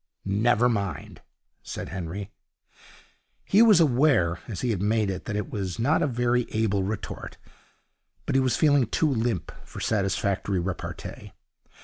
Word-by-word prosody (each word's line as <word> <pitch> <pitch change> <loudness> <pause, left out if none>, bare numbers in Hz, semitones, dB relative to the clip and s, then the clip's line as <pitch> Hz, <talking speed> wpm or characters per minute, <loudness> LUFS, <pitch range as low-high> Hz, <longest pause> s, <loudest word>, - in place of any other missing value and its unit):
'Never 110 +4 +3
mind,' 100 -6 -3 0.4
said - - -6
Henry. 95 +2 -5 1.1
He 205 - +4
was 215 -6 +7
aware, 125 - +3
as 100 -6 -5
he 120 -4 0
made 105 +1 +1
it, 95 - -6
that 105 - -3
it 105 +9 -3
was 95 -7 -3
not 140 +7 +2
a - - +2
very 120 -1 +1
able 110 -3 0
retort, 100 0 -5 0.9
but - - -2
he 135 - +4
was 130 -2 +1
feeling 145 -5 +4
too 155 +6 +1
limp 115 -7 -1
for - - -10
satisfactory 100 -1 0
repartee. 90 0 -6
110 Hz, 140 wpm, -26 LUFS, 95-125 Hz, 1.1 s, was